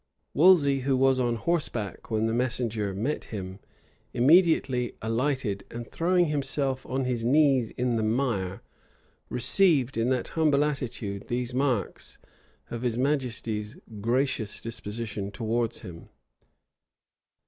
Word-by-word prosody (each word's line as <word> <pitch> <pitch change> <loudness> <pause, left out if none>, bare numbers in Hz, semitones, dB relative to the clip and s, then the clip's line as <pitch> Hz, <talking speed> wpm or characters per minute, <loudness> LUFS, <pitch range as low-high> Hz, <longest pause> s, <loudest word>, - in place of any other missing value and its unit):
Wolsey, 150 -5 +5
who 135 0 +1
was 135 0 +3
on 120 -2 +1
horseback 120 - -2
when 110 0 +1
the 115 - 0
messenger 115 -4 -1
met 115 +10 -2
him, 95 -2 -7 0.6
immediately 135 -3 +4
alighted; 115 -2 -1
and, 120 0 -7
throwing 175 +1 +2
himself 140 -3 -1
on 130 0 -1
his 120 -2 -1
knees 135 -2 +3
in 125 -1 +1
the 110 - 0
mire, 110 -5 -1 0.7
received 140 - +3
in 115 +2 +1
that 130 -2 0
humble 150 -3 +2
attitude 120 -8 -4
these 125 0 -2
marks 125 -6 -1 0.5
of 115 - -4
his 120 -2 -1
majesty's 120 -6 -1 0.2
gracious 120 -2 0
disposition 110 -2 -5
towards 115 +3 -2
him. 85 -5 -10
125 Hz, 120 wpm, -27 LUFS, 110-140 Hz, 0.7 s, Wolsey